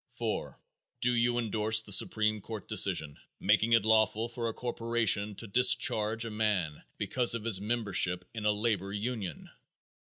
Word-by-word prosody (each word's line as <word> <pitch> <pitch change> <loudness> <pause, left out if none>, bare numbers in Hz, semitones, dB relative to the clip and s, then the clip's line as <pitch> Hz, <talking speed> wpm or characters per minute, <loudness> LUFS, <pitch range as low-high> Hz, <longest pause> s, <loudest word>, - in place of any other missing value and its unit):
4. - - -5 0.4
Do 125 - +3
you 120 0 +1
endorse 110 -1 +1
the 110 - -10
supreme 110 +2 +2
court 110 -1 -8
decision 75 -2 +1 0.2
making 115 +2 +2
it 115 -2 +3
lawful 110 0 +2
for 115 -1 -4
a - - -5
corporation 115 -4 0
to 115 - -6
discharge 115 -1 +2
a 115 - -6
man 105 -8 -2 0.2
because 120 +4 +1
of 115 - -5
his 100 -5 +2
membership 100 -5 0
in 110 -2 -6
a - - +4
labor 105 -2 -2
union? 105 -5 -5
110 Hz, 155 wpm, -29 LUFS, 100-115 Hz, 0.4 s, a